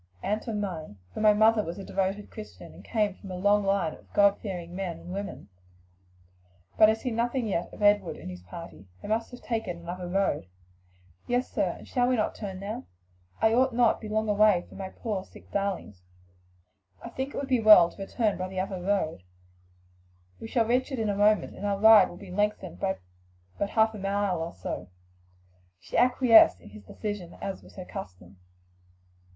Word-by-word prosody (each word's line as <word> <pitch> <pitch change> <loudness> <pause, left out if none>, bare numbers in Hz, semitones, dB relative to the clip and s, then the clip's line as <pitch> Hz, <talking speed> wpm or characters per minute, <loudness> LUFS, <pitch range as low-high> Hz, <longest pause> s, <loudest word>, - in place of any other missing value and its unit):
"And 210 +2 -1
from 220 -3 -3
mine; 165 - -5 0.2
for - - -6
my 215 -1 +7
mother 220 0 +4
was 170 -1 -6
a 195 - -7
devoted 195 +2 -2
Christian 215 -1 -10
and - - -14
came 210 -4 -1
of 195 - -8
a 185 - -5
long 205 +3 +3
line 195 -5 +1
of - - -17
God 200 -1 +4
fearing 175 -4 -6
men 185 -3 -4
and 180 - -9
women. 200 +1 -6 1.3
But 215 - +7
I 220 - +3
see 245 +3 -4
nothing 240 +2 0
yet 185 -5 -2
of - - -8
Edward 205 -3 +3
and - - -10
his 90 0 -9
party; 95 - -11 0.2
they - - -6
must 225 +2 -1
have 245 - -12
taken 220 -7 -3
another 175 +1 -6
road." 180 - 0 0.8
"Yes, 245 +1 0
sir; - - 0
and - - -13
shall 245 -2 +1
we 255 - +2
not 215 - 0
turn 195 -3 -6
now? 210 +5 -5 0.6
I 220 0 +5
ought 255 0 +3
not 240 -2 +3
to 220 - -6
be - - -8
long 220 0 0
away 205 -3 +4
from - - -13
my 190 -1 -5
poor 205 -2 -4
sick - - -17
darlings." 195 - -3 1.0
"I - - -6
think 265 +2 -5
it - - -4
would 280 - -3
be 255 -3 +2
well 210 -6 +8
to - - -12
return 210 +1 -1
by 185 - -2
the 185 0 -5
other 190 -1 -3
road; 180 - -1 1.2
we - - -7
shall 230 -1 +1
reach 250 +4 +1
it 265 - -3
in 220 -2 -1
a 200 - 0
moment, 210 +1 +2
and - - -10
our 200 -1 0
ride 215 -1 +7
will 175 - -11
be 190 -1 -11
lengthened 210 +3 -1
by 190 -1 -1 0.6
but 200 - 0
a - - -13
half 220 0 +3
mile 195 -3 -1
or 165 - -5
so." 90 0 -6 0.9
She 85 - -9
acquiesced 245 - +6
in 90 - -15
his 105 -1 -13
decision, 205 - -6
as 195 -1 -5
was - - -17
her 185 - -7
custom. 95 - -9
200 Hz, 200 wpm, -28 LUFS, 185-220 Hz, 1.3 s, well